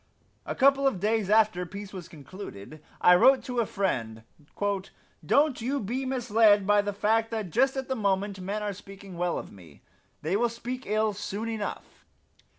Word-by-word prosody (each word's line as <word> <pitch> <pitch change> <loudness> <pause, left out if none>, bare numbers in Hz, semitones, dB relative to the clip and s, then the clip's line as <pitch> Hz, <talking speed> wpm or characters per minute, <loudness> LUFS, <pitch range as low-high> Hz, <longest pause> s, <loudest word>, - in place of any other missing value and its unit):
A - - -3
couple 275 0 +4
of 215 -9 0
days 215 0 0
after 215 -4 +3
peace 200 +3 -8
was 180 -3 -8
concluded 155 - -10 0.2
I 180 - +7
wrote 260 +9 +5
to 250 -1 -3
a 230 - +1
friend: 115 - -2 1.0
"Don't 285 -4 +2
you 270 +5 -1
be 250 +5 -3
misled 225 -5 +3
by 205 +1 +4
the 205 0 -3
fact 220 +3 +1
that 215 -6 -4
just 265 - +2
at 265 - -3
the 265 - -1
moment 200 -2 -1
men 205 +3 -3
are 205 -1 -2
speaking 195 -1 -12
well 175 0 -1
of - - -7
me. 85 -7 -16 0.4
They 165 +5 0
will 240 +3 +2
speak 245 +3 -6
ill 215 +1 +1
soon 205 +2 -5
enough. 220 -2 -6
205 Hz, 175 wpm, -27 LUFS, 190-235 Hz, 1.0 s, I